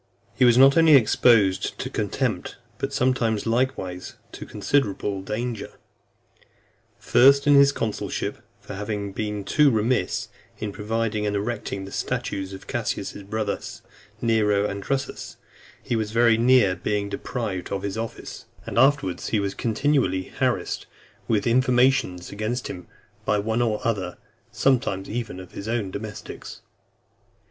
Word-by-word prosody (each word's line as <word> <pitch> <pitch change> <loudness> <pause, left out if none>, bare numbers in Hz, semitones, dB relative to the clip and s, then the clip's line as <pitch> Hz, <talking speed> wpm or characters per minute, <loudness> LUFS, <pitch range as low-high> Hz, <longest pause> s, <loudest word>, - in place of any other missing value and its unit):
IX. - - -28
He 125 - +6
was 120 -1 +5
not 135 +3 +7
only 165 -2 +7
exposed 110 -5 +4
to - - -4
contempt, - - -2 0.2
but - - -2
sometimes 120 -4 +1
likewise 115 -7 -2 0.2
to - - -9
considerable 100 -7 -1
danger: 115 +4 -4 1.2
first, 140 +2 +5
in 145 - +5
his 140 0 +7
consulship; 110 -6 -3 0.2
for, - - -9
having 100 0 -4
been 105 0 -3
too 150 +8 +4
remiss 110 -3 0 0.3
in 105 -1 -4
providing 105 0 -2
and 105 - -1
erecting 100 -2 -3
the 95 - -10
statues 95 -1 -3
of 95 - -9
Caius's - - -3
brothers, 105 +1 -4 0.4
Nero 105 -3 +2
and 100 -1 -3
Drusus, 135 +5 -4 0.5
he 120 - -1
was 110 -2 -1
very 115 +1 +4
near 115 -5 +4
being 100 +3 -2
deprived 100 -4 -4
of 100 -1 -2
his 100 0 -3
office; 115 0 -6 0.2
and - - -1
afterwards 135 -8 +2
he 110 - +1
was 100 -1 -2
continually 120 -4 +1 0.2
harassed - - -1 0.4
with 105 -3 +1
informations 125 -6 +2
against 110 +4 -3
him 90 -1 -8 0.4
by 105 - +1
one 110 +3 0
or 110 -3 +1
other, 95 -6 -1 0.3
sometimes 125 -8 +1
even 115 -3 -4
by 95 - -8
his 100 - -7
own 110 -4 -1
domestics. 105 +1 -8
110 Hz, 140 wpm, -24 LUFS, 100-125 Hz, 1.2 s, not